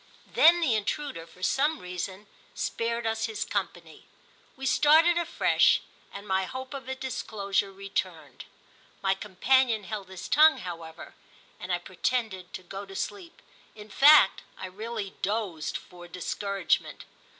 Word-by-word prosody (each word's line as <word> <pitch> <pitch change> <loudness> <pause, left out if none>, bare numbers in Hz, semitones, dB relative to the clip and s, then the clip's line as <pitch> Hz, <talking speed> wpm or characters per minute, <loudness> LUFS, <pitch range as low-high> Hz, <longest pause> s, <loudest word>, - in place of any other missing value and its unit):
Then 345 +2 +6
the 290 -8 +2
intruder, 215 - -3
for 180 +2 -15
some 295 +9 +2
reason, 185 +1 -6 0.3
spared 230 0 -2
us 225 0 0
his 220 -2 -3
company; - - -5 0.5
we 270 - -7
started 315 +5 +5
afresh, 345 -1 +3 0.3
and 200 +1 -9
my 190 0 +1
hope 260 +6 -7
of 270 -3 -7
a 265 - -2
disclosure 205 -6 -2
returned. 195 +1 -5 0.6
My 195 0 +3
companion 220 +4 +1
held 200 -1 -6
his 185 -2 -8
tongue, 310 +2 +6
however, 165 -2 -8 0.5
and 180 - -6
I 175 - +2
pretended 185 +1 -3
to 185 - -8
go 195 +3 -7
to 195 - -11
sleep; 365 - -6 0.3
in 210 0 -12
fact 290 -6 +7 0.2
I - - -6
really 210 +1 -6
dozed 200 -6 -2
for 175 -1 -13
discouragement. 195 +2 -2
210 Hz, 140 wpm, -28 LUFS, 185-260 Hz, 0.6 s, fact